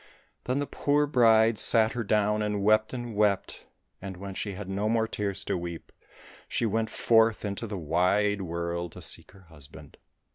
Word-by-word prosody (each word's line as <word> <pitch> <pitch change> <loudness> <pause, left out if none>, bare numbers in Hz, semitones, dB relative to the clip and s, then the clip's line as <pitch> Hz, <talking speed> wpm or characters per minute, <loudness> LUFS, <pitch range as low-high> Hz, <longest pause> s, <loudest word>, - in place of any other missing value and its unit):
Then 125 +2 -1
the 145 - -1
poor 145 +1 +1
bride 115 -5 +4
sat 110 -1 +4
her 120 - -3
down 105 0 +1
and 105 -1 -1
wept 110 +1 +3
and 120 -3 -6
wept, 105 -2 0 0.3
and 95 -1 -7
when 100 +1 -7
she 100 +1 -4
had 95 +1 -7
no 100 +3 -1
more 115 0 +1
tears 100 -2 -2
to - - -2
weep, 85 -2 -6 0.6
she - - -1
went 110 +1 0
forth 110 -1 +2
into 100 +3 -4
the 100 -2 -5
wide 90 +5 +1
world 85 -1 -4
to - - -11
seek - - -2
her 100 -1 -17
husband. 75 -4 -14
105 Hz, 180 wpm, -27 LUFS, 95-110 Hz, 0.6 s, bride